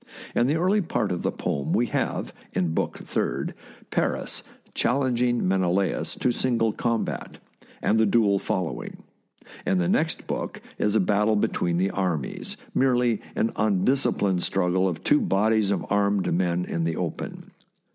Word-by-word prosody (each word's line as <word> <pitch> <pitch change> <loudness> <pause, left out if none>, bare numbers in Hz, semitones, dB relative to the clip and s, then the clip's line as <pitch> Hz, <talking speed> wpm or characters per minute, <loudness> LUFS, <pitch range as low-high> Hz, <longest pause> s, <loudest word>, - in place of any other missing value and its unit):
In 120 - +3
the 145 - +2
early 185 +5 +3
part 135 - -1
of 90 - -2
the - - 0
poem 70 -1 -2
we - - +3
have, - - -2 0.2
in 90 -3 0
Book - - -1
Third, - - -1 0.4
Paris - - -1 0.3
challenging 125 -3 +1
Menelaus 95 0 +1
to 125 - +1
single 120 -2 +1
com 115 +1 0
bat, - - -6 0.5
and 110 - +3
the 110 - +4
duel 100 -2 +3
following; 90 -3 -3 0.6
in 95 - +1
the 90 -1 +1
next - - 0
book - - -4 0.2
is 105 0 +1
a - - +5
battle 105 +3 +2
between 85 -4 0
the 95 +2 +1
armies, 90 -7 -2 0.2
merely 125 -4 +2
an 115 - 0
undisciplined 100 -2 +2
struggle 95 0 +1
of 85 -3 -3
two 150 - +4
bodies 105 +1 +2
of 100 - 0
armed 100 -2 +2
men 90 0 +1
in 85 - -2
the 80 0 0
open. - - -5
100 Hz, 155 wpm, -25 LUFS, 90-120 Hz, 0.6 s, a